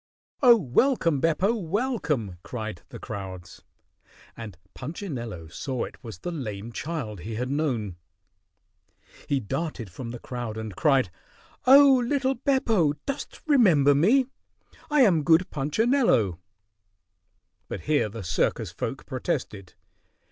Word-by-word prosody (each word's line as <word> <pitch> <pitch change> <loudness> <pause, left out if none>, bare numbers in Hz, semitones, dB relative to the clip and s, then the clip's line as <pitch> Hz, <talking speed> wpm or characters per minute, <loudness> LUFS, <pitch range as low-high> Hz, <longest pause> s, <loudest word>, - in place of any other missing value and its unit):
"Oh, 245 -3 +8
welcome, 165 - +2
Beppo! 170 +7 +2
Welcome!" 170 - -2
cried 110 -6 -6
the - - -9
crowds, 95 -3 -8 0.7
and 105 -6 -9 0.2
Punchinello 125 - -6
saw 130 - -3
it - - -9
was 115 -2 -8
the 175 - -5
lame 115 - -5
child 130 - -5
he 110 +6 -6
had 125 +4 -3
known. 120 - -1 1.3
He 140 - +2
darted 120 - -4
from 120 +5 -7
the 120 - -6
crowd 120 -3 -6
and 110 -3 -6
cried, 135 - +2 0.6
"Oh, 270 -1 +8
little 270 +1 +1
Beppo, 230 - +2
dost 275 0 -5
remember 185 - +5
me? 220 - +4 0.6
I 295 -1 +4
am 185 -10 +5
good 165 +4 +4
Punchinello." 150 - +2 1.3
But - - -5
here 145 -7 +1
the 110 0 -7
circus 85 -2 0
folk - - -5
protested. 100 -3 -4
145 Hz, 120 wpm, -26 LUFS, -, 1.3 s, Oh